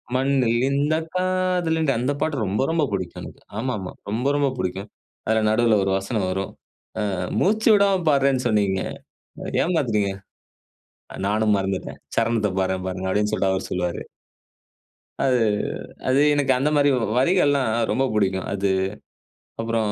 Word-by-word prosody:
மண்ணில் 130 -2 +2
இந்த 145 +3 +1 0.2
காதல் 185 -2 +1
இன்றி 155 -4 +2
அந்த 125 +3 0
பாட்டு 155 -2 0
ரொம்ப 100 +3 -1
ரொம்ப 165 -2 +1
புடிக்கும் 95 -3 -4
எனக்கு. - - -11 0.2
ஆமாமா, 110 -7 -3 0.2
ரொம்ப 120 +6 -1
ரொம்ப 140 -1 +2
புடிக்கும். 95 +3 -3 0.4
அதில 110 0 +3
நடுவுல 110 -1 +3
ஒரு 95 - 0
வசனம் 100 0 -2
வரும். 95 +1 -3 0.6
"அ - - -3 0.3
மூச்சு 220 +3 +2
விடாம 200 -1 +4
பாடுறேன்னு 135 -3 +2
சொன்னிங்க, 100 -4 +1 0.8
ஏமாத்துறீங்க. 115 - +1 1.2
நானும் 105 0 +2
மறந்துட்டேன். 95 -1 -3 0.2
சரணத்தை 115 -3 +1
பாடுறேன் 95 0 -1
பாருங்க," 95 0 -4
அப்படின்னு 105 +2 +1
சொல்லிட்டு 95 -1 +1
அவரு 95 0 -2
சொல்லுவாரு. 90 -1 -2 1.2
அது 130 -2 +3 0.7
அது 130 - +3 0.2
எனக்கு 140 -2 +2
அந்த 145 +3 +1
மாரி 145 0 +4 0.3
வரிகள்லாம் 140 -3 +3 0.2
ரொம்ப 135 - +1
புடிக்கும். 95 -3 0
அது 100 0 0 0.9
அப்புறம் 115 -2 0
115 Hz, 135 wpm, -23 LUFS, 100-140 Hz, 1.2 s, விடாம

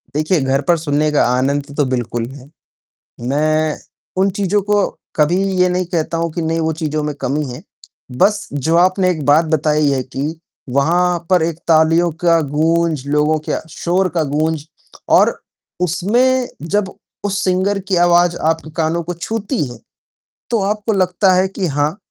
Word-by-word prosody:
देखिए, 155 +3 +1
घर 135 +1 +1
पर 170 -1 +4
सुनने 150 -1 0
का 150 - +3
आनंद 140 +3 -1
तो 145 - +3
बिल्कुल 120 -2 -2
है। 135 0 -13 0.8
मैं 155 +2 +1 0.4
उन 195 - +3
चीज़ों 200 +1 +1
को 205 0 +2 0.3
कभी 155 +3 +2 0.2
ये 180 0 +4
नहीं 180 0 0
कहता 165 0 -1
हूँ 165 0 -1
कि 170 - -3
नहीं 165 0 -1
वो 160 0 0
चीज़ों 155 -1 -1
में 150 0 -2
कमी 145 +4 -1
है। 125 - -9 0.6
बस 205 +8 +2
जो 150 +4 0
आपने 185 +1 +3
एक 155 -5 -4
बात 150 +4 +4
बताई 150 -1 +2
है 135 -1 0
कि 145 +5 -5 0.4
वहाँ 175 +4 +2
पर 180 -2 +4
एक 165 -1 -2
तालियों 165 +1 +4
का 165 -1 +5
गूँज, 155 0 0
लोगों 150 +2 +2
के - - 0
शोर 185 +4 0
का 165 - +2
गूँज 155 0 -1 0.5
और - - +2 0.4
उसमें 240 +9 +2
जब 190 +4 -1 0.3
उस 195 -1 -1
सिंगर 190 +2 +1
की 190 - +2
आवाज़ 175 0 +3
आपके 160 -1 -5
कानों 165 +1 0
को 175 +2 -4
छूती 220 - -3
है, 120 - -10 0.7
तो 230 -3 +1
आपको 210 +2 -1
लगता 185 0 +2
है 185 +1 +3
कि 190 -1 -3
हाँ, 145 +4 -1
165 Hz, 170 wpm, -17 LUFS, 150-185 Hz, 0.8 s, का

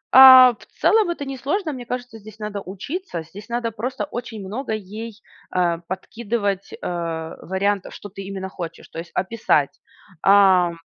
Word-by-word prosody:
А, 260 -1 +11
в 210 -3 -15
целом 435 -5 +4
это 315 -4 -3
не 270 -1 -5
сложно, 310 +4 -1
мне 245 -2 -7
кажется, 245 -2 -5
здесь 215 +1 -13
надо 210 -1 -4
учиться, 195 - -5
здесь 205 +8 -12
надо 235 -1 -1
просто 250 +6 -3
очень 230 -5 -6
много 220 +4 -4
ей, 215 +2 -7 0.3
а, 175 -2 +1
подкидывать, 200 0 -3
э, - - -8 0.7
вариантов, 195 +1 -1
что 205 - -9
ты 195 +1 -9
именно 190 -1 -5
хочешь, 170 -3 -8
то 165 - -7
есть 170 - -8
описать. 190 -7 +1 0.5
Ам, 190 -4 +5
210 Hz, 160 wpm, -22 LUFS, 190-245 Hz, 0.7 s, А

